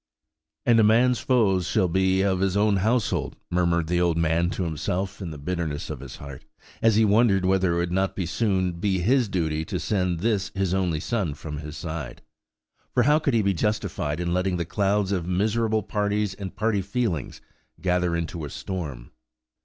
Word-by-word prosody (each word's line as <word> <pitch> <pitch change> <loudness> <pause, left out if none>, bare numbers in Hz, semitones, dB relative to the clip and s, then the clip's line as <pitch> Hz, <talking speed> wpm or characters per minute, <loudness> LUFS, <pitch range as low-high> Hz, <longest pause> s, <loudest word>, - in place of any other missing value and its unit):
"And 115 -1 +5
a - - +6
man's 120 +4 +4
foes 100 -8 +2
shall 100 -5 +2
be 95 +2 +2
they - - +2
of 95 -2 +1
his 95 +1 +1
own 105 -1 +3
household," 110 +3 0 0.2
murmured 85 -1 +2
the 85 +2 0
old 85 -2 +2
man 85 +1 +2
to 95 - -3
himself 90 +5 -3
in 90 - -4
the 75 - -7
bitterness 75 -1 -3
of - - -6
his 70 +2 -9
heart, 70 -4 -10 0.4
as 115 -1 +4
he 110 +1 +5
wondered 105 -3 +3
whether 95 -2 +2
it - - 0
would 85 0 -1
not 95 +2 0
soon 95 -3 0
be 95 0 +1
his 120 +5 +2
duty 80 -4 -1
to - - -3
send 90 -5 -1
this 105 -2 0
his 95 -2 0
only 90 -5 0
son 95 -7 -2
from 75 -1 -7
his 75 0 -7
side. 80 -5 -6 0.7
For 125 - +4
how 150 +4 +4
could 140 -5 0
he 110 - +3
be 100 0 +2
justified 85 -5 -1
in 85 0 -1
letting 90 0 0
the 85 - -2
clouds 100 +2 0
of 90 -4 -1
miserable 110 +3 +1
parties 105 0 -1
and 95 -2 -7
party 105 -2 +1
feelings 95 - -2 0.4
gather 90 -2 +1
into 85 0 -3
a 75 - -5
storm? 75 -9 -6
95 Hz, 190 wpm, -25 LUFS, 85-105 Hz, 0.7 s, a